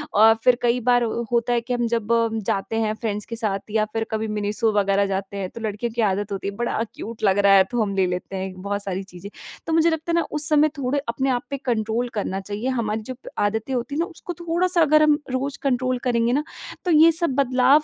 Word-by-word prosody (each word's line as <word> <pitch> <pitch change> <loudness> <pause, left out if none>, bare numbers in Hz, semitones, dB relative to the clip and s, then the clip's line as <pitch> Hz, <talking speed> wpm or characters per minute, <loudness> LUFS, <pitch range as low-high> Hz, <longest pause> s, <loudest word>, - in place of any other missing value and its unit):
अ, 220 +2 +7
फिर 250 - +6
कई 240 +1 +2
बार 245 +1 +3
अ, - - 0 0.2
होता 240 0 +1
है 240 - +1
कि 245 +2 -4
हम 240 -1 0
जब 230 -1 -1
अ, 230 0 +3 0.2
जाते 195 +3 -1
हैं 215 -1 0
फ्रेंड्स 210 -2 -3
के 230 - -6
साथ 215 -4 -1
या 215 0 +2
फिर 225 - 0
कभी 220 0 -1
मिनिसो 210 +1 0
वग़ैरह 200 0 +2
जाते 195 0 -3
हैं, 190 -2 -3
तो 230 - -10
लड़कियों 220 +2 -3
की 240 - +1
आदत 205 0 0
होती 195 0 -3
है 200 - -4
बड़ा 235 0 -1
क्यूट 225 0 -8
लग 195 -2 +3
रहा 200 -1 +5
है, 195 -1 +7
तो 240 -1 0
हम 200 -2 -1
ले 190 -1 +3
लेते 180 +2 -4
हैं 190 0 -4
बहुत 200 +1 -2
सारी 195 -1 -3
चीज़ें। 190 0 -11 0.4
तो 325 - -1
मुझे 325 +1 +4
लगता 320 +1 -2
है - - +2
ना 340 - +3
उस 300 0 0
समय 305 0 +4
थोड़ा 275 +1 0
अपने 265 +3 -1
आप 245 -2 0
पे 280 - -3
कंट्रोल 230 0 0
करना 195 -3 -2
चाहिए, 205 +5 -5
हमारी 225 -4 -1
जो 255 +4 -6
प - - -12 0.2
आदतें 220 +5 -3
होती 250 +3 -2
हैं - - -1
ना, 335 - +2
उसको 355 -1 -8
थोड़ा-सा 345 +1 0
अगर 305 0 +5
हम 300 -1 +4
रोज़ 270 +2 -2
कंट्रोल 255 -1 0
करेंगे 235 -1 +1
ना, 290 +3 +1 0.4
तो 355 - +1
ये 320 +1 +7
सब 335 +1 +2
बदलाव 265 +2 +4
230 Hz, 250 wpm, -23 LUFS, 205-265 Hz, 0.4 s, अ